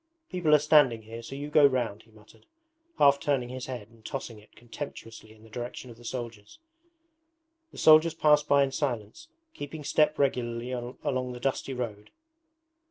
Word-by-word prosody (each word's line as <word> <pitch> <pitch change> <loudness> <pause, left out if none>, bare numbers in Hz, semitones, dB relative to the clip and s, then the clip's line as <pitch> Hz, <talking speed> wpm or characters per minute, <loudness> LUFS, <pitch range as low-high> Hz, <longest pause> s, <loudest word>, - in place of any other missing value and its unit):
'People 170 -5 +3
are - - +8
standing 145 -6 +4
here, 115 +2 -9
so 125 +4 -8
you 145 +1 -6
go 150 -1 +5
round,' 120 -6 +2
he 115 - -24
muttered, 110 - -21 0.5
half 140 -1 +5
turning 140 -5 -1
his 130 0 -6
head 120 -5 -6
and 115 -1 -22
tossing 120 -4 -6
it 105 - -22
contemptuously 115 -3 -9
in 110 0 -18
the 110 - -16
direction 120 +1 -7
of 115 - -14
the 120 - -16
soldiers. 115 -4 -7 1.1
The - - -15
soldiers 155 +1 +6
passed 150 -2 +3
by 140 -1 +5
in 135 - -1
silence, 135 - -4 0.3
keeping 150 +1 -7
step 150 +1 +2
regularly 125 -3 -1
along 125 +1 -3
the 125 - -8
dusty 135 +1 -2
road. 110 -4 -5
125 Hz, 170 wpm, -28 LUFS, 115-145 Hz, 1.1 s, are